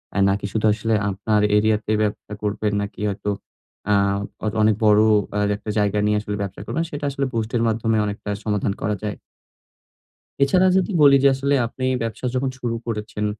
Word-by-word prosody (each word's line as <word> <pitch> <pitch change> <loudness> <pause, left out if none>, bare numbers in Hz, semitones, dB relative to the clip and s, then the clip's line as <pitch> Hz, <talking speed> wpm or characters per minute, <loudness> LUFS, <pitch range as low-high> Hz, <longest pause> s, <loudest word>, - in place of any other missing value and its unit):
আ - - -1
নাকি 100 +1 -1
শুধু 110 0 0
আসলে 110 +1 -1 0.2
আপনার 105 +2 0 0.2
এরিয়া 110 0 +3
তে 110 - 0
ব্যবসা 105 0 -4
করবেন 105 0 -1
নাকি 100 0 -8
হয়তো 100 +1 -3 0.6
আ - - +5 0.5
অন 110 - 0
অনেক 110 0 +4
বড় 105 0 +6 0.6
একটা 105 - -9
জায়গা 105 0 +1
নিয়ে 105 0 +2
আসলে 105 -1 -4
ব্যবসা 100 -1 -5
করবেন, 165 - -1
সেটা 145 0 -4
আসলে 140 0 -1
বুস্ট 110 -1 -2
এর 115 - +1
মাধ্যমে 115 0 +1
অনেকটা 105 0 -5 0.2
সমাধান 105 -2 0
করা 105 +1 0
যায়। 105 -1 -3 1.3
এছাড়া 180 +7 +4
যদি 190 +2 +1
বলি 140 -1 +7
যে - - +8
আসলে 140 +1 0
আপনি 130 +3 -4 0.2
ব্যবসা 115 +2 -4
যখন 130 +1 0
শুরু 120 -2 -2
করেছেন, 105 -2 -4
110 Hz, 180 wpm, -22 LUFS, 105-120 Hz, 1.3 s, যে